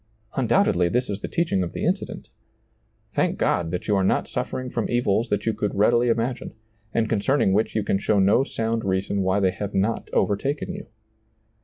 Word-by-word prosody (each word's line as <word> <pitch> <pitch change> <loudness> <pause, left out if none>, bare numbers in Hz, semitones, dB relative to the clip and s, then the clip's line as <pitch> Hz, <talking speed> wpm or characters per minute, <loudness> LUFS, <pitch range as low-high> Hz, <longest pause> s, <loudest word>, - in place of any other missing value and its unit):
Undoubtedly 85 0 +2
this 125 +1 0
is 100 0 -4
the - - -3
teaching 165 - 0
of 85 -2 -3
the - - -3
incident - - -2 0.8
Thank - - +1
God 85 -1 +1
that 90 +1 -4
you 105 - +3
are 95 - +2
not 95 - +1
suffering 130 -1 -4
from 115 - -2
evils 120 -1 +1
that 105 0 -1
you 115 - +1
could 105 - -2
readily 120 +4 +3
imagine, 120 +2 -1 0.4
and 115 -1 +1
concerning 110 0 +2
which 110 +2 +1
you 110 - +1
can 95 - 0
show 105 +1 +1
no 100 +6 +4
sound 115 -3 -2
reason 95 +1 0
why 95 +1 +2
they 95 -2 +2
have 100 +2 -5
not 105 +4 0
overtaken 140 - 0
you. 200 +1 -8
105 Hz, 190 wpm, -24 LUFS, 95-120 Hz, 0.8 s, no